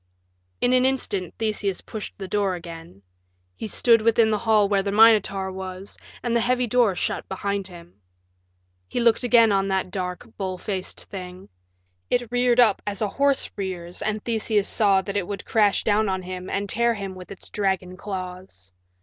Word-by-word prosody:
In 245 - +3
an 255 0 +4
instant 205 -9 -1
Theseus 210 -4 -1
pushed 215 -2 -8
the 195 - -6
door 195 -1 0
again. 165 - -10 0.5
He - - -5
stood 230 +2 +4
within 225 0 +3
the 215 - +2
hall 215 -2 +3
where 200 -1 +2
the 200 0 -2
Minotaur 205 -3 +4
was, 190 +1 -8 0.3
and 235 0 0
the - - +4
heavy 250 +1 +1
door 235 -4 +2
shut - - -3
behind 200 0 -2
him. 175 - -14 0.9
He - - -3
looked 235 -2 +3
again 235 -3 +5
on 195 -1 +2
that 190 -1 -1
dark, 180 -2 -4
bull 190 -2 -3
faced 190 0 -5
thing. 185 -1 -9 0.6
It 245 -2 0
reared 245 0 +2
up 220 -5 +5
as 205 +1 -2
a 210 - 0
horse 280 +4 +1
rears 180 -3 -5
and 215 -1 -2
Theseus 220 -3 0
saw 195 -3 +3
that 200 +1 -3
it 185 -3 -2
would 200 -1 -5
crash 210 -3 +2
down 210 0 +2
on 190 -1 -2
him 185 0 -6
and 200 0 -2
tear 235 +3 +1
him 195 -2 -5
with 185 -1 -11
its 195 - -8
dragon 190 -3 -1
claws. 185 - -8
200 Hz, 180 wpm, -24 LUFS, 185-225 Hz, 0.9 s, again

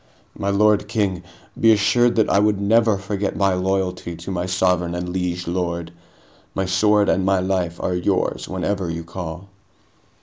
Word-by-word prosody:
"My 100 - -2
lord 105 +1 +3
king, 100 -5 -1 0.4
be 115 - +6
assured 120 +3 +3
that 110 -2 +3
I 100 - +3
would 105 -1 +2
never 110 +1 +3
forget 100 0 -3
my 100 -1 +2
loyalty 90 -2 -2
to 85 +3 -7
my 90 -1 -2
sovereign 90 -2 +1
and 90 0 -3
liege 90 -1 -3
lord. 85 -1 -3 0.6
My 95 - 0
sword 105 +2 +3
and 95 - +2
my 95 0 +2
life 90 -2 -1
are 90 - -1
yours 90 0 -1
whenever 95 0 -2
you 85 0 -4
call." 85 +1 -7
95 Hz, 165 wpm, -21 LUFS, 90-100 Hz, 0.6 s, be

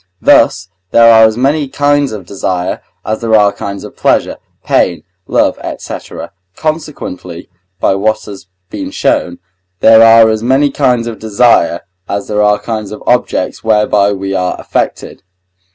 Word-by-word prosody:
Thus 95 - +3 0.2
there 115 +2 +6
are 110 0 +7
as 110 0 0
many 140 +3 0
kinds 145 +1 0
of 105 -4 -7
desire, 90 -1 -3 0.2
as 110 0 -3
there 115 -1 +1
are 105 -1 +3
kinds 100 -1 -6
of - - -11
pleasure, - - 0 0.3
pain, - - 0 0.2
love, - - +1 0.2
&c., - - -7 0.6
consequently 145 - -5 0.3
(by - - +2
what 105 +3 -1
has 100 -3 -11 0.2
been - - -5
shown) 85 - -1 0.4
there 110 0 +6
are 115 0 +6
as 110 0 -2
many 135 +4 +2
kinds 125 -4 +1
of 115 -3 -6
desire, 110 -6 +2 0.3
as 100 0 -3
there 105 0 -1
are 105 0 +3
kinds 110 -3 -5
of 105 - -9
objects 125 -6 -1
whereby 105 -2 +2
we 95 0 -4
are 90 -1 -2
affected. - - -3
110 Hz, 150 wpm, -12 LUFS, 100-120 Hz, 0.6 s, are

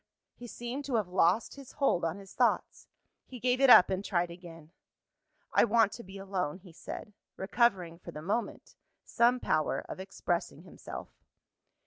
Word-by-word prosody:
He 245 - -11
seemed 240 +4 -6
to 265 - -2
have 210 -5 0
lost 180 +4 +2
his 275 -2 -12
hold 275 - +1
on 165 +3 -1
his 195 -1 -13
thoughts - - 0 0.4
he 255 - -9
gave 250 +2 +1
it 270 - +6
up, 190 -6 +9
and 190 +1 -1
tried 175 -4 0
again. 165 -2 -12 0.8
"I - - +5
want 225 -2 +3
to 235 - -8
be 190 +1 -11
alone," 190 -5 -3
he 180 -3 -16
said; 210 - -8 0.2
recovering, 190 -5 +1
for 175 - -11
the 155 -2 -8
moment, 210 +7 -3 0.3
some 240 +1 +3
power 155 - 0
of - - -7
expressing 175 -5 -3
himself. 180 - -9
195 Hz, 165 wpm, -30 LUFS, 175-235 Hz, 0.8 s, up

